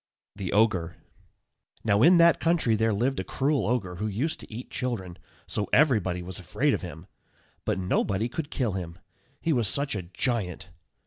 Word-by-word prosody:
THE 95 -3 -4
OGRE. 100 -6 +2 0.9
Now, 105 -1 +3
in 175 +6 +7
that 170 0 +6
country 165 -9 +2
there 110 +1 +2
lived 125 +6 0
a - - -1
cruel 140 -1 0
ogre, 100 -7 -1
who 105 - -2
used 125 +11 -2
to - - -11
eat 120 +4 -8
children, 110 -9 -3 0.3
so 105 - -3
everybody 105 - +3
was 90 +1 -6
afraid 135 - 0
of - - -1
him; 85 -1 -8 0.6
but - - 0
nobody 95 +3 0
could 145 +5 -5
kill 125 -8 -1
him, 85 -3 -5 0.4
he 165 - +1
was 120 -5 +1
such 140 +6 0
a 100 - -2
giant. 95 -1 -2
110 Hz, 175 wpm, -27 LUFS, 95-135 Hz, 0.9 s, in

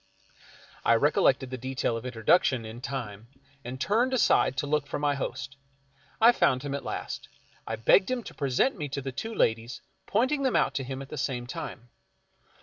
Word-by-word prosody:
I 115 - +5
recollected 130 0 +2
the 130 - -4
detail 130 -2 -1
of 115 +2 -5
introduction 125 +1 +2
in 110 +2 -8
time, 115 -6 -5 0.4
and 125 +2 -6
turned 235 - +2
aside 140 - +3
to 145 - 0
look 145 -1 0
for - - -3
my 145 0 +1
host. 135 0 -5 0.6
I 230 +2 +8
found 130 - +2
him 140 -1 -3
at 140 - -3
last. - - -5 0.4
I 115 - -2
begged 115 - +4
him 255 -2 -1
to - - -9
present 140 - +1
me 150 -7 -4
to 140 - -3
the 135 - -3
two 220 - -5
ladies, 115 +2 0 0.3
pointing 260 +7 +1
them 265 -2 +1
out - - +2
to 135 - -2
him 135 +1 -5
at 135 - -13
the 150 - -5
same 125 -2 -2
time. 120 0 -7
135 Hz, 190 wpm, -28 LUFS, 125-150 Hz, 0.6 s, I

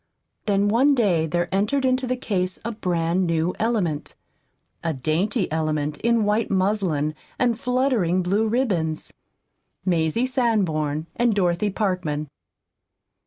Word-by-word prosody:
Then 200 0 +2
one 260 +7 +4
day 180 -10 +2
there 175 +2 0
entered 215 +8 +1
into 255 0 +1
the 255 +1 -1
case 185 -6 -1
a 230 - -1
brand 180 -3 0
new 165 +1 0
element, 205 -10 -1 0.7
a 165 -3 -1
dainty 175 - 0
element 155 -2 -1
in 235 -1 +2
white 210 +2 +1
muslin 185 -6 +1 0.2
and 240 -2 +1
fluttering 245 -9 +1
blue 200 +5 +1
ribbons 195 -10 -1 0.7
Mazie 170 +5 +1
Sanborn 180 - 0
and 240 -3 +2
Dorothy 180 +1 +1
Parkman. 180 -8 -2
190 Hz, 120 wpm, -23 LUFS, 165-230 Hz, 0.7 s, one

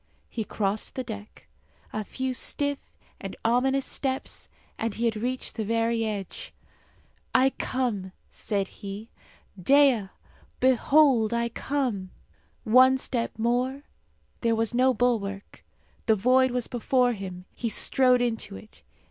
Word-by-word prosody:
He 225 - -3
crossed 205 0 -2
the 260 - -2
deck. 215 -3 -9 0.5
A 215 - -2
few 260 +5 -3
stiff 285 +3 -1 0.4
and - - -6
ominous 265 +3 +2
steps, 265 -1 -3 0.3
and 225 -2 -2
he 235 - -1
had 225 -1 +1
reached 250 +4 -3
the 220 - -3
very 230 +1 +1
edge. 205 -3 -5 0.8
"I 265 +1 +5
come," 225 -10 -2 0.2
said 200 -3 -2
he; 205 +2 -8 0.5
"Dea, 265 -3 +4 0.5
behold, 260 -2 +4
I 235 0 0
come!" 235 -7 -2 0.5
One 255 +3 +6
step 240 -4 -2
more; 250 +4 0 0.6
there 230 -1 +2
was 225 0 0
no 255 +2 +4
bulwark; 210 -5 -1 0.4
the 220 - +5
void 255 +5 +4
was 245 -1 -2
before 245 +1 +1
him; 185 -3 -7
he 235 - -3
strode 250 +2 +3
into 225 - -2
it. 95 +2 -14
235 Hz, 130 wpm, -27 LUFS, 215-260 Hz, 0.8 s, One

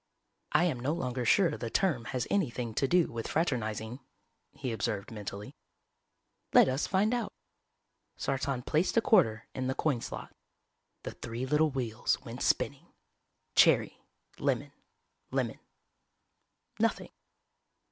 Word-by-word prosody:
"I - - +4
am 155 -9 0
no 135 +5 0
longer 125 -6 -2
sure 180 - +4
the 115 - -4
term 145 - +1
has 125 0 -2
anything 125 - 0
to 135 - +1
do 175 +2 +3
with 115 -1 -4
fraternizing," 120 -6 -1 0.5
he 130 -3 -4
observed 105 -2 -2
mentally. 105 -1 -7 1.0
"Let - - +8
us 130 +2 0
find 205 +5 +2
out." 240 -4 -1 0.9
Sartan 135 -1 -1
placed 160 +8 +1
a - - +6
quarter 130 - +3
in 130 -1 -2
the 130 - -1
coin 140 -7 0
slot. - - -7 0.7
The - - -4
three 115 +3 -5
little 150 +3 +3
wheels 125 -4 -1
went 120 +1 -7
spinning. 140 +4 0 0.7
Cherry. - - +4 0.4
Lemon. - - 0 0.6
Lemon. - - -1 1.2
Nothing. - - 0
130 Hz, 125 wpm, -31 LUFS, 115-160 Hz, 1.2 s, Let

